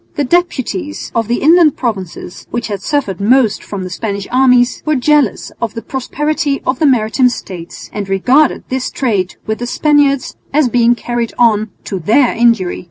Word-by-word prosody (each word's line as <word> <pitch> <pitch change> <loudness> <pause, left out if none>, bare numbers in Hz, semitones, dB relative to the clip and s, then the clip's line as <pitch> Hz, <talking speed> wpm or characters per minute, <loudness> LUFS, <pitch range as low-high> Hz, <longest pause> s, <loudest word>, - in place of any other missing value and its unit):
The 290 - 0
deputies 325 0 -1
of 225 -2 0
the 240 +2 -1
inland 325 -1 +5
provinces, 190 -7 -5
which 240 -1 -4
had 200 -2 -4
suffered 200 - -2
most 230 0 +2
from 200 -2 -6
the 185 - -5
Spanish 200 0 -4
armies, 250 -1 +3
were 305 -1 +1
jealous 285 -3 +1
of 230 -2 -3
the 230 - -6
prosperity 290 +3 -2
of 255 0 -1
the 310 - +3
maritime 250 0 +3
States, 180 -7 -8
and 200 -2 -4
regarded 255 +10 +2
this 260 0 -2
trade 205 -8 -1
with 220 0 -3
the 245 - -4
Spaniard 290 0 +2 0.3
as 285 -3 +2
being 240 0 +3
carried 240 -1 -3
on 220 -2 +3
to 190 - -4
their 230 - +3
injury. 230 -6 +1
245 Hz, 170 wpm, -15 LUFS, 215-280 Hz, 0.3 s, inland